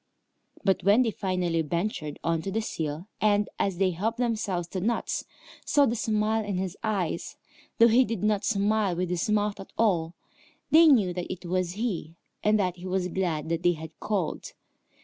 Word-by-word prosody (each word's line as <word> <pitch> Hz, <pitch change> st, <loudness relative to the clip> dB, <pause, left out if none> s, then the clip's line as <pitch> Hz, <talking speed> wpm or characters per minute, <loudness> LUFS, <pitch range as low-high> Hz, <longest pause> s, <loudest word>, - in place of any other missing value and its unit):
But 195 Hz, -1 st, +2 dB
when 205 Hz, +6 st, +5 dB
they 230 Hz, -, 0 dB
finally 180 Hz, -5 st, -1 dB
ventured 160 Hz, -2 st, -3 dB
on 165 Hz, -1 st, 0 dB
to 195 Hz, -, -4 dB
the 220 Hz, -, 0 dB
sill 160 Hz, -6 st, -4 dB, 0.2 s
and, 205 Hz, -1 st, +3 dB
as 195 Hz, -3 st, 0 dB
they 190 Hz, 0 st, +2 dB
helped 215 Hz, +7 st, -2 dB
themselves 215 Hz, -8 st, -1 dB
to 185 Hz, -, -4 dB
nuts, 230 Hz, +4 st, -1 dB, 0.4 s
saw 285 Hz, -1 st, +4 dB
the 235 Hz, -, 0 dB
smile 220 Hz, 0 st, 0 dB
in 200 Hz, -3 st, -3 dB
his 185 Hz, 0 st, -3 dB
eyes, 200 Hz, -6 st, -2 dB, 0.4 s
though 230 Hz, -, +7 dB
he 240 Hz, +3 st, +5 dB
did 225 Hz, -5 st, -4 dB
not 210 Hz, -1 st, +2 dB
smile 205 Hz, -2 st, +1 dB
with 180 Hz, 0 st, -2 dB
his 180 Hz, +3 st, -1 dB
mouth 210 Hz, -1 st, +1 dB
at 195 Hz, -, -10 dB
all, 175 Hz, -7 st, +1 dB, 0.6 s
they 325 Hz, +1 st, +8 dB
knew 215 Hz, -, +4 dB
that 180 Hz, 0 st, -4 dB
it 185 Hz, 0 st, -7 dB
was 180 Hz, 0 st, -1 dB
he, 190 Hz, -7 st, -3 dB, 0.3 s
and 210 Hz, +1 st, +4 dB
that 185 Hz, -3 st, 0 dB
he 180 Hz, +1 st, -8 dB
was 185 Hz, -1 st, -1 dB
glad 165 Hz, -4 st, -2 dB
that 165 Hz, 0 st, -1 dB
they 175 Hz, 0 st, +3 dB
had 160 Hz, 0 st, -10 dB
called. 195 Hz, -7 st, -2 dB
190 Hz, 190 wpm, -27 LUFS, 175-215 Hz, 0.6 s, they